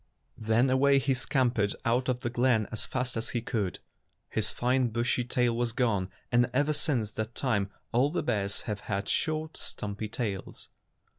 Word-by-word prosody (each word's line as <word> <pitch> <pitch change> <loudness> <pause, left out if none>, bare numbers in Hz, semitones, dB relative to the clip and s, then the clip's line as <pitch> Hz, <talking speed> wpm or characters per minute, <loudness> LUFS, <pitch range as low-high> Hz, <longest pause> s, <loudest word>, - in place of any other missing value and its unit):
Then 110 +3 +3
away 140 +1 +5
he 135 0 +1
scam 130 -1 +1
pered 105 -3 0
out 125 +2 +2
of 125 -1 0
the 120 - -2
glen 120 -3 +2
as 110 - -2
fast 125 -1 -2
as 115 0 -2
he - - -1
could 105 -8 -1
go. - - -31 0.5
His 110 -1 +2
fine 125 +1 +1
bushy 120 +2 0
tail 120 -1 +1
was 120 -1 0
gone, 110 -7 +1 0.2
and 120 +1 +4
ever 145 +3 +3
since 135 -8 +1
that 110 +2 -4
time 105 -7 +1 0.2
all 125 +4 +3
the 170 - -1
bears 100 -4 -1
have 105 -2 -4
had 100 0 -1
short, 155 0 -1
stumpy 105 +1 -3
tails. 105 -4 -4
120 Hz, 180 wpm, -29 LUFS, 110-130 Hz, 0.5 s, away